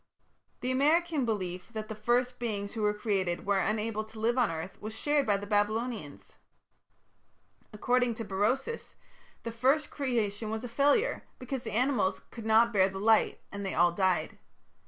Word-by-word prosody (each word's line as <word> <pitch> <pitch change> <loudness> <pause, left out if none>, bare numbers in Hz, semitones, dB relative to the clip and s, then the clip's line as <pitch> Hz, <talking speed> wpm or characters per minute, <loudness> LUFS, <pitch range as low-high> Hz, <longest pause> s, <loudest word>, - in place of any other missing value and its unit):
The 255 - -1
American 305 +2 +2
belief 185 -5 -3
that 215 -1 -4
the 220 - -5
first 245 +3 0
beings 205 -4 -3
who 225 - -4
were 210 0 +3
created 195 -4 -1
were 200 -1 +2
unable 215 +1 -1
to 220 0 -12
live 230 +2 +1
on 250 -4 +3
earth 165 +3 -6
was 215 +1 -6
shared 290 +1 +1
by 205 -1 +3
the 200 - -6
Babylonians. 205 - -2 1.4
According 245 +2 +1
to 225 - -5
Berosus 215 - -1 0.5
the 230 - -4
first 265 +6 +1
creation 225 -6 -1
was 220 +1 -3
a - - -3
failure, 290 - +2
because 255 0 -4
the 225 -3 -6
animals 250 -4 +1
could 225 -2 -7
not 230 +1 +5
bear 190 -1 +4
the 190 - -7
light 220 +2 +3
and 200 0 -5
they 195 - -3
all 175 0 +4
died. 185 0 0
220 Hz, 170 wpm, -30 LUFS, 205-250 Hz, 1.4 s, not